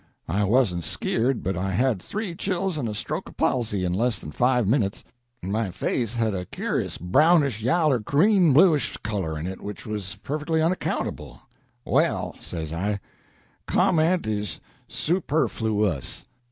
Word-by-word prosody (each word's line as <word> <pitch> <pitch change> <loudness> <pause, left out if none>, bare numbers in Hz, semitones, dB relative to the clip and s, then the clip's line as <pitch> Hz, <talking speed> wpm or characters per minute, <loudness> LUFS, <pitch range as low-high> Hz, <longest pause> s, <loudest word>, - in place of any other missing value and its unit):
I 100 +5 +1
wasn't 100 -6 +2
skeered, 120 - -1
but 95 +1 -1
I 95 +3 -1
had 110 +1 +1
three 205 - -4
chills 185 0 -1
and 120 -5 -2
a 105 - -4
stroke - - -4
of - - -17
palsy 105 -7 0
in 90 - 0
less 115 +4 +1
than 75 - -8
five 125 - +2
minits, 105 -4 +1 0.4
and 95 - -3
my 110 -1 0
face 115 +5 -2
had 115 -2 +1
a 90 -2 -4
cur'us - - -2
brownish 140 - +3
yaller 135 +2 +3
greenbluish 160 - +4
color 95 -7 -2
in 75 - -4
it, 95 +1 -5
which 105 0 -7
was 105 -2 -4
perfectly 150 +3 -1
unaccountable. 165 +3 -2 0.4
'Well,' - - +1
say 80 -2 -5
I, 100 +4 -1 0.7
'comment 180 -1 +3
is 105 -6 -2 0.3
super 160 -2 0
flu 110 -2 0
ous.'" 80 -10 -3
115 Hz, 155 wpm, -25 LUFS, 95-150 Hz, 0.7 s, greenbluish